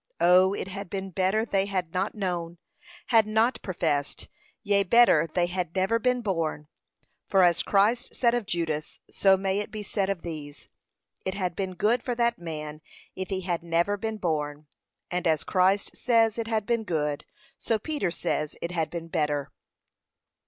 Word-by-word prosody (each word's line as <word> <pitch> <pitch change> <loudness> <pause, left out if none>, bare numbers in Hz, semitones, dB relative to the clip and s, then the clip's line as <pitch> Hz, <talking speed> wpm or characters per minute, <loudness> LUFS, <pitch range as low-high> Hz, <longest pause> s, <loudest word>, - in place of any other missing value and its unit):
Oh! 185 +2 +5
it - - -4
had 195 -1 -6
been 195 0 -4
better 190 +5 +1
they 195 -3 +1
had 185 -4 -2
not 190 +4 -1
known, 175 -4 -3 0.5
had 225 -3 +5
not 220 +4 +2
professed; 155 -6 -2 0.3
yea, 200 -2 +3
better 195 -5 +5
they 175 +1 +2
had 175 -1 -3
never 195 +5 +2
been 250 +1 +1
born; 165 -7 -2 0.6
for 190 -2 +4
as 175 -2 +4
Christ 215 +5 +1
said 235 -2 +3
of 240 -4 -1
Judas, 160 -3 -3
so 195 -1 +4
may 195 +1 0
it 205 - -4
be 215 -1 -6
said 195 -1 -1
of 195 -4 -2
these, 150 -3 -8 0.5
it 190 0 -3
had 180 -4 -2
been 190 -2 -3
good 220 +7 +2
for 245 - -2
that 235 -2 +1
man 155 -2 -6 0.3
if 190 0 -5
he 190 -1 -2
had 175 -2 -2
never 170 +4 +1
been 220 +2 -4
born; 150 -5 -2 0.5
and 180 0 -1
as 160 -2 +2
Christ 190 +2 +1
says 230 -2 +2
it 230 - -2
had 220 -2 0
been 230 0 0
good, 150 -6 -1 0.4
so 225 - 0
Peter 290 - -2
says 155 -3 -2
it 170 - -4
had 165 -3 -1
been 170 -1 -6
better. 150 -4 -1
190 Hz, 175 wpm, -27 LUFS, 165-210 Hz, 0.6 s, Oh